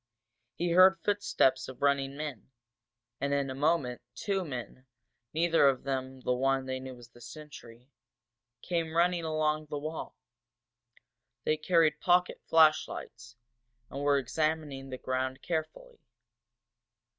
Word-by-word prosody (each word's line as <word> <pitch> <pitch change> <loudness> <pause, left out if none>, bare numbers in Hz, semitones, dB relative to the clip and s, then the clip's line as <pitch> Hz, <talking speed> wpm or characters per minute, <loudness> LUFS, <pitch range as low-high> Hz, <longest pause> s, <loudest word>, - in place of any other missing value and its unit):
He 175 0 -1
heard 185 +2 +7
footsteps 135 -10 +1
of 130 +1 -9
running 140 -1 +1
men, 150 -7 -6 0.7
and 140 0 0
in 140 -1 -1
a - - -3
moment 135 -3 0
two 195 - -1
men, 130 -3 -7 0.4
neither 165 -2 +3
of 130 -2 -2
them 130 -1 -4
the 125 - 0
one 135 +1 +1
they 130 0 -3
knew 130 -1 -8
as 120 -1 -14
the 120 - -18
sentry, 120 -2 -12 0.8
came 165 -2 -2
running 175 0 +2
along 155 -1 0
the 145 - -4
wall. 155 +2 -6 1.3
They 155 - +2
carried 160 0 +2
pocket 180 0 +2
flashlights, 145 -6 +2 0.6
and 140 - -5
were 145 0 +3
examining 145 0 -2
the 130 - -5
ground 130 +1 -3
carefully. 180 - -4
145 Hz, 130 wpm, -30 LUFS, 130-160 Hz, 1.3 s, heard